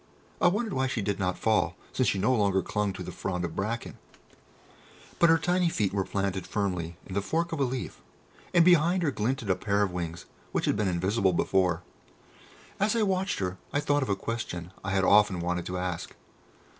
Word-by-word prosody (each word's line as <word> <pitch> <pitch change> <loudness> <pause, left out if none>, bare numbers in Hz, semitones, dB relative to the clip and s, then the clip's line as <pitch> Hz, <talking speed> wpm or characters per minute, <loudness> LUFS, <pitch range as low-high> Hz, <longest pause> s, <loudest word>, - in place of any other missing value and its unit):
I - - +6
wondered 210 +3 0
why 130 0 +1
she 120 -5 -2
did 100 0 -1
not 90 -1 0
fall, 110 -1 +1 0.2
since - - +1
she - - 0
no 110 +7 +2
longer 100 -5 +2
clung 105 0 -1
to - - -6
the - - -6
frond 90 -2 -3
of 80 - -6
bracken; 115 +4 -3 1.2
but 170 - +6
her 165 - +6
tiny 180 0 +1
feet 105 - 0
were 100 -2 0
firmly 95 -1 -1
planted 90 -5 -2
in 95 - -8
the 100 - +1
fork 165 - -1
of 160 - -3
a - - +3
leaf, 130 0 -4 0.5
and 170 -2 +5
behind 175 +1 +4
her 150 - +2
glinted 115 -2 -1
a - - +3
pair 100 +2 +1
of 100 - -1
wings 85 -1 -5 0.3
which - - 0
had - - +2
been 105 -1 0
invisible 95 +2 +1
before. 90 -1 +1 1.0
As 210 +3 +2
I 225 - +2
watched 190 -1 0
her 90 -1 -3
I 145 - +1
thought 145 0 +1
of 135 - -2
a 100 - +2
question 90 -6 -4
I 95 - -3
had 95 0 +1
often 100 -2 +5
wanted 90 0 -2
to 90 - -3
ask. 90 -2 -4
100 Hz, 205 wpm, -28 LUFS, 95-145 Hz, 1.2 s, I